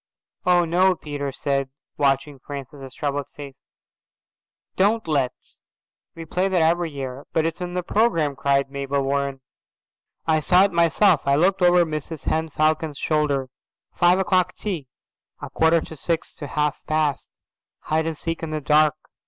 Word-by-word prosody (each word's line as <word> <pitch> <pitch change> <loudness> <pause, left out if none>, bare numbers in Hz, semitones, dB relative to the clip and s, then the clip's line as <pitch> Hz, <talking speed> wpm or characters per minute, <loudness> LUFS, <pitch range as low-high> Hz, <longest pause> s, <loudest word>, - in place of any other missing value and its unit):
"Oh, 175 -1 +4
no," 180 +3 +3
Peter 145 -3 -5
said, 135 0 -2 0.3
watching 140 0 0
Francis's 135 -1 -9
troubled 145 -1 -2
face, 140 -2 -9 1.2
"don't 210 +1 +2
let's. 140 -5 -2 0.5
We 165 -1 -8
play 180 +4 0
that 190 -2 +1
every 170 +1 +2
year." 135 -2 -7
"But 160 - +2
it's 165 +2 -3
in 180 0 -4
the 180 - -1
programme," 165 -9 +1
cried 140 0 +1
Mabel 140 0 -2
Warren. 140 0 -1 0.8
"I 160 -1 +3
saw 180 +4 +4
it 200 - +2
myself. 170 0 +3
I 140 - +4
looked 185 +5 +2
over 175 -1 +5
Mrs 155 -1 -6
Henne 160 0 0
Falcon's 155 0 0
shoulder. 145 -4 0 0.4
Five 175 +1 +4
o'clock 185 -1 +1
tea. 175 -10 -4 0.5
A - - -8
quarter 160 +1 +3
to 160 - -9
six 165 +3 -2
to 145 - -5
half 150 0 -1
past, 155 -3 0 0.5
hide 160 +1 0
and 160 -2 -3
seek 165 +1 -4
in 165 - -4
the 155 0 -2
dark. 150 +1 +3
155 Hz, 155 wpm, -23 LUFS, 140-175 Hz, 1.2 s, over